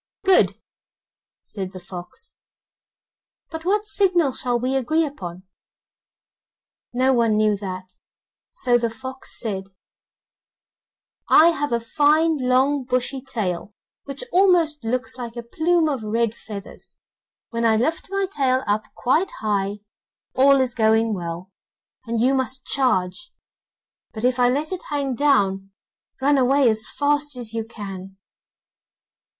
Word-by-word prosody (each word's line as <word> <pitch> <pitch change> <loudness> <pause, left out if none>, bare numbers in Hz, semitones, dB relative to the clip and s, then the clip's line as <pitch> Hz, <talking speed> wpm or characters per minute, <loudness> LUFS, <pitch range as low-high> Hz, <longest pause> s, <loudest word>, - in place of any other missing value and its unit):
'Good,' 380 -1 +4 0.8
said 190 -2 -6
the 185 - -8
fox, 180 -1 -10 1.2
'but 320 0 -7
what 415 +3 +1
signal 360 -8 +2
shall 245 -1 -1
we 255 +2 -1
agree 310 +5 +1
upon?' 185 - -7 1.5
No 260 +2 +2
one 230 -3 +2
knew 215 -1 +3
that, 185 -2 -6 0.6
so 245 - +1
the 235 -1 0
fox 260 +3 -8
said: 195 -5 -3 1.6
'I 330 - +7
have 290 -4 -2
a 235 - +2
fine 300 +7 +2
long 260 +2 +2
bushy 255 +1 -1
tail, 205 -6 -4 0.3
which 275 -1 -6
almost 345 -6 +3
looks 250 +2 -2
like 235 -1 -6
a 235 - -5
plume 320 +7 +1
of 275 -5 -2
red 225 +1 0
feathers. 210 -3 -10 0.6
When 230 0 -2
I 225 -1 +4
lift 315 +11 -1
my 395 0 0
tail 265 -8 0
up 215 +1 -1
quite 315 +10 +1
high, 205 -1 -1 0.5
all 275 +1 +5
is 255 -2 -1
going 220 -1 +2
well, 175 0 -5 0.6
and 230 0 -1
you 255 +4 +3
must 260 0 -2
charge; 250 - 0 0.8
but 220 - -7
if 250 0 +2
I 245 0 +5
let 290 +6 -1
it 370 - -4
hang 280 -3 -1
down, 200 -9 +2 0.5
run 280 +1 +3
away 265 +1 +4
as 220 0 -1
fast 290 0 0
as 235 -3 -6
you 225 -1 -2
can. 195 -4 -9
250 Hz, 135 wpm, -22 LUFS, 215-290 Hz, 1.6 s, I